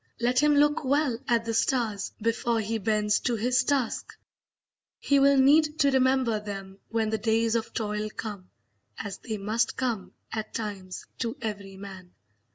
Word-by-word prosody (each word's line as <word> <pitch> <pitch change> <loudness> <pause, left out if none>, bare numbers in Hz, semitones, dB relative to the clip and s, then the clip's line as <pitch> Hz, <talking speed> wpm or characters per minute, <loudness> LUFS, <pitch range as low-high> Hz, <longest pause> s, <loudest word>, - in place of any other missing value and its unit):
Let 245 +2 +2
him 295 0 +4
look 295 +1 +3
well 275 -3 +1
at 230 -1 +2
the 230 - -2
stars 225 -4 0
before 230 +1 0
he 220 +1 -2
bends 210 0 +1
to 240 - 0
his 245 +3 +2
task; 275 -5 -1 0.8
he 280 -1 +2
will 280 0 +5
need 300 +3 +5
to 280 -2 +4
remember 260 -4 +2
them 195 -2 -7
when 225 -1 0
the 220 - 0
days 225 +1 +1
of 230 -1 -1
toil 210 -1 -2
come, 205 -4 -7 0.5
as 200 -1 -6
they 220 -3 -4
must 215 +3 0
come, 235 -7 -2 0.2
at 220 -1 -5
times, 200 -4 -5
to 235 +3 -2
every 200 -4 -5
man. 190 -2 -10
225 Hz, 165 wpm, -27 LUFS, 210-255 Hz, 0.8 s, will